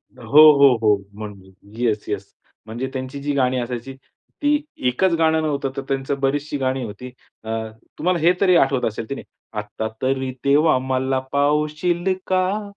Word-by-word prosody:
हो, 130 +4 +3 0.2
हो, 140 0 +8
हो, 105 -1 +4 0.2
म्हण 105 -1 -6 0.4
येस, 110 -4 0
येस. 100 -2 -4 0.3
म्हणजे 115 +4 -4
त्यांची 130 +1 -5
जी 145 0 -1
गाणी 130 -1 +1
असायची 120 +2 -5 0.5
ती 295 0 +2 0.3
एकच 170 +8 +2
गाणं 160 -1 +3
नव्हतं 140 -3 -1
तर 135 - -3
त्यांची 135 +1 -1
बरीचशी 145 +2 -1
गाणी 130 -1 -1
होती. 115 +4 -8 0.3
अ, 110 - -6 0.5
तुम्हाला 180 +1 +1
हे 170 +3 +5
तरी 185 -3 +5
आठवत 135 -3 +2
असेल 110 +1 -6
की 140 - -3
नाही. - - -9 0.4
आता 105 +1 -5
तरी 130 0 0
देवा 145 0 +4
मला 130 0 -1
पावशील 150 +5 +1
का? 190 +3 0
135 Hz, 160 wpm, -21 LUFS, 125-155 Hz, 0.5 s, हो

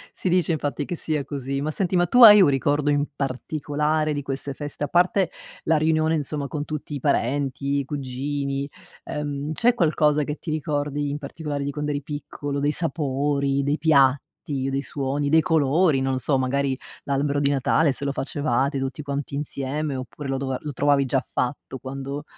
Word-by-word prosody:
si - - -3
dice, 175 -2 +2
infatti, 145 -1 -2
che 175 - -4
sia 155 -3 -2
così, 135 -1 -4
ma 150 - -1
senti 180 +3 -1
ma 175 0 +3
tu 245 +8 +6
hai 210 -2 +11
un 180 - +6
ricordo 145 +2 +1
in 145 0 +2
particolare 150 +3 -1
di 145 -1 -2
queste 135 0 -4
feste, 145 +1 -5
a - - -5
parte 180 +2 +3 0.4
la 160 0 +3
riunione, 155 +1 +2
insomma, 145 -1 -3
con 145 0 -4
tutti 150 -1 -5
i - - -4
parenti, 140 +1 0
i 140 - -3
cugini, 140 0 -3 0.4
ehm, 145 0 -4
c'è 240 +8 +3
qualcosa 150 -5 +2
che 150 +1 -4
ti - - -7
ricordi 145 -2 -1
in 145 - -3
particolare 145 0 -4
di 140 - -2
quando 150 +1 -3
eri 145 0 -2
piccolo, 145 0 -5
dei 145 +1 +1
sapori, 140 -3 0
dei 145 +2 0
piatti, 140 -2 +2
dei 135 +1 0
suoni, 140 0 -2
dei 160 +2 +5
colori, 160 -2 +3
non 135 0 0
lo - - 0
so, 135 +1 +1
magari 135 +1 0 0.3
l'albero 140 +1 0
di 140 0 +2
Natale 145 +3 +2
se 140 - -6
lo 140 - 0
facevate 140 0 -1
tutti 135 +3 -4
quanti 140 0 -4
insieme 145 0 -3
oppure 130 +2 -6
lo 135 0 -1
dova 130 -1 -2
lo 150 -1 -6
trovavi 140 +1 +3
già 130 0 0
fatto 130 +1 -3
quando 135 +2 -6
145 Hz, 190 wpm, -24 LUFS, 140-150 Hz, 0.4 s, hai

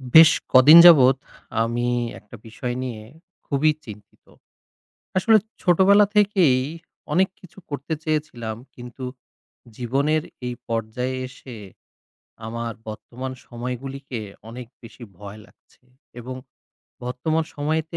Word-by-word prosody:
বেশ 160 0 +11 0.2
কদিন 140 +6 +9
যাবৎ 135 -7 +8 0.5
আমি 120 +1 -1 0.3
একটা 105 - -14
বিষয় 120 +2 -5
নিয়ে 120 -4 -6 0.4
খুবই 150 +2 +2
চিন্তিত। 105 -2 -13 0.9
আসলে 220 +4 +5 0.3
ছোটবেলা 195 +3 +5
থেকেই 195 -10 +4 0.5
অনেক 190 +1 +3
কিছু 185 +1 -17
করতে 145 +3 -4
চেয়েছিলাম 150 -8 -3 0.2
কিন্তু 125 +1 -9 0.7
জীবনের 140 +6 0 0.2
এই 125 - -3
পর্যায়ে 115 +3 -3
এসে, 130 -2 -12 0.9
আমার 115 +1 -4 0.2
বর্তমান 125 +4 -7
সময়গুলিকে 125 +1 -6 0.3
অনেক 120 +1 -9
বেশি 120 +1 -13
ভয় 100 +2 -10
লাগছে। - - -28 0.4
এবং 130 +2 -7 0.7
বর্তমান 155 +6 -1
সময়তে 155 +3 -2
130 Hz, 105 wpm, -23 LUFS, 120-155 Hz, 0.9 s, বেশ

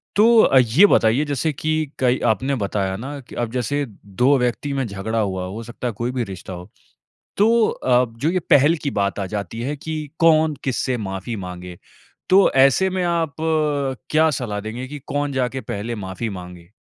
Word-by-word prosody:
तो 210 - +5 0.2
अ, 135 - +4
ये 125 - +5
बताइए 120 - +3
जैसे 145 +2 -1
की 155 +2 -1
कई 125 0 +2
आपने 135 +4 -2
बताया 95 -1 -2
ना 140 +6 -6
की - - -13
अब 120 -2 -2
जैसे 140 +4 -1 0.2
2 125 +8 +2
व्यक्ति 125 +3 -1
में 135 -1 -1
झगड़ा 105 +3 -3
हुआ 95 -3 -1
हो 105 +5 -6
सकता 120 +2 -6
है 115 - -2
कोई 120 +4 -3
भी 125 -1 -2
रिश्ता 95 -2 -8
हो। 90 +2 -9 0.7
तो 225 +2 +4
अ, 125 0 +2
जो 145 +7 0
ये 185 - +1
पहल 145 +4 +5
की 140 - -1
बात 100 +1 -1
आ 100 - -2
जाती 105 +3 -4
है 140 +5 -2
की 160 +3 -5 0.2
कौन 160 -2 +4
किससे 130 -1 -1
माफ़ी 95 +1 -5
माँगे? 90 -1 -8 0.5
तो 190 +1 +6
ऐसे 135 +8 +4
में 185 -1 -2
आप 165 -4 -1 0.8
क्या 160 +1 +4
सलाह 115 -6 -3
देंगे 115 +5 -6
की 145 +1 -8
कौन 145 0 -1
जाके 130 0 -1
पहले 110 +1 -4
माफी 100 +2 -5
माँगे? 90 -3 -9
125 Hz, 190 wpm, -21 LUFS, 105-145 Hz, 0.8 s, तो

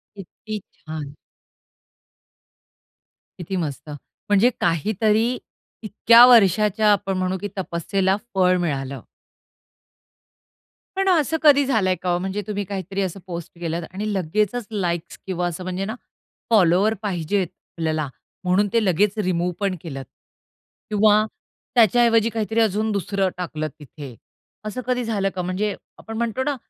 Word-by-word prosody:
किती 210 +3 -7
छान! 150 -2 -8 2.2
किती 185 +2 -5
मस्त! 150 -3 -4
म्हणजे 205 - 0
काहीतरी 215 +7 +2 0.5
इतक्या 230 +3 +7
वर्षाच्या 210 -1 +5
आपण 195 -2 0
म्हणू 185 0 -1
की 205 - -2
तपस्येला 190 +2 0 0.2
फळ 185 -1 +4
मिळालं. 140 -6 -3 2.0
पण 390 0 +2
असं 320 -2 +2
कधी 285 -2 +6
झालंय 200 -8 +2
का 180 - -2
हो, 175 - +2
म्हणजे 190 +3 -3
तुम्ही 205 -1 -2
काहीतरी 195 0 -4
असं 190 0 -3
पोस्ट 170 -2 -6
केलत 170 0 -2
आणि 205 +3 -3
लगेचच 210 +5 -1
लाइक्स 175 -5 -2
किंवा 180 -1 -1
असं 175 +1 -5
म्हणजे 185 +1 -3
ना, 220 - -4 0.5
फॉलोवर 200 0 +4
पाहिजेत 190 -1 -1
आपल्याला 160 -2 -4 0.4
म्हणून 185 +3 +2
ते 230 -2 +3
लगेच 200 +4 +2
रिमूव्ह 180 0 0
पण 195 -2 0
केलत? 135 -5 -7 0.8
किंवा 215 0 +4 0.5
त्याच्याऐवजी 230 0 +4
काहीतरी 225 0 -1
अजून 215 0 +1
दुसरं 200 -1 0
टाकलं 155 -3 -3
तिथे. 145 -4 -10 0.5
असं 230 +4 -4
कधी 250 -1 0
झालं 205 -4 0
का? 185 - -2
म्हणजे 190 +3 -2 0.2
आपण 225 0 -8
म्हणतो 235 +2 -1
ना 290 0 -1
195 Hz, 130 wpm, -22 LUFS, 175-215 Hz, 2.2 s, इतक्या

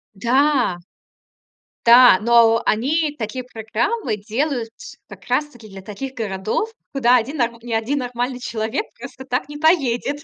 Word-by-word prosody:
Да! 250 -2 +1 1.1
Да. 240 -4 +8
Но 230 0 +4
о - - -6
они 295 +7 0
такие 240 +3 -5
программы 230 - -3
делают, 230 +2 -3 0.4
как - - -13
раз-таки 245 -7 -2
для 195 -1 -10
таких 260 +7 -7
городов, 215 - -2 0.2
куда 250 -3 +4
один 265 +7 -3 0.2
ни 235 0 -6
один 230 +6 -1
нормальный 245 0 -3
человек 235 - -3
просто 265 - -10
так 250 +1 -2
не 295 - -7
поедет. 290 -3 +1
245 Hz, 135 wpm, -20 LUFS, 225-280 Hz, 1.1 s, Да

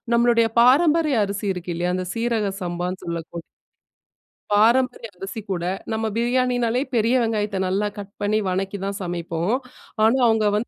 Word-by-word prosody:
நம்மளுடய 235 -1 +4
பாரம்பரிய 300 +2 +4
அரிசி 200 +1 -4
இருக்கு 180 -1 -5
இல்லயா! 175 +1 -1
அந்த 185 -1 -4
சீரக 230 -3 0
சம்பான்னு 180 +1 -4
சொல்லக்கூ 170 0 -5 1.1
பாரம்பரிய 235 +2 +3
அரிசி 195 +4 -6
கூட, 175 -2 -2 0.3
நம்ம 220 0 -1
பிரியாணினாலே 245 0 +1
பெரிய 230 +2 +3
வெங்காயத்த 210 -3 -1
நல்லா 200 +3 0
கட் 200 0 -8
பண்ணி, 205 +1 +1
வணக்கி 195 +2 -2
தான் 200 0 -3
சமைப்போம். 175 +3 -2 0.5
ஆனா, 230 +4 +4
அவுங்க 220 -1 +2
வந்து 215 +3 -1
215 Hz, 140 wpm, -22 LUFS, 185-235 Hz, 1.1 s, நம்மளுடய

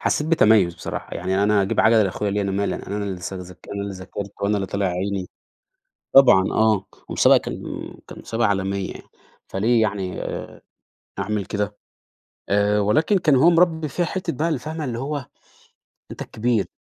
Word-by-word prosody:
حسّيت 150 - 0
بتميُّز 105 - +4
بصراحة. 90 - -6
يعني 95 +3 0
أنا 105 -1 +3
أجيب 95 - +1
عَجَلة 110 0 +5
لأخويا 100 +1 -1
ليه؟ 105 +1 0
أنا 100 - -1
مالي، 100 +1 -1
أنا 105 0 -4
لسّه 95 -1 -5
ذاك 90 0 -11
أنا 100 - -3
اللي 100 -1 -4
ذاكرت 100 +2 -7
وأنا 100 +1 +1
اللي 95 -1 -2
طلع 100 +1 -1
عيني، 95 +1 -2 0.9
طبعًا 125 -9 +8
آه. 110 -3 +2 0.2
ومسابقة - - +5
كان - - -5 0.4
كان - - -10
مسابقة 115 -1 0
عالمية، 100 -1 -1 0.5
فليه 115 +4 +2
يعني 100 -4 -2
آآ - - -6 0.6
أعمل 105 -1 -2
كده؟ 105 0 -3 0.7
آآ 105 +1 +2
ولكن 155 - +2
كان 150 -6 +3
هو 165 +7 +6
مربّي 165 -2 +2
فيّا 175 +6 -1
حتّة 180 0 -3
بقى 165 +3 -1
اللي 155 -5 0
فاهمة؟ 155 +2 -5
اللي 120 -3 -3
هو، 140 0 -4 0.9
أنت - - -8
الكبير. 115 -2 -1
105 Hz, 170 wpm, -22 LUFS, 100-125 Hz, 0.9 s, طبعًا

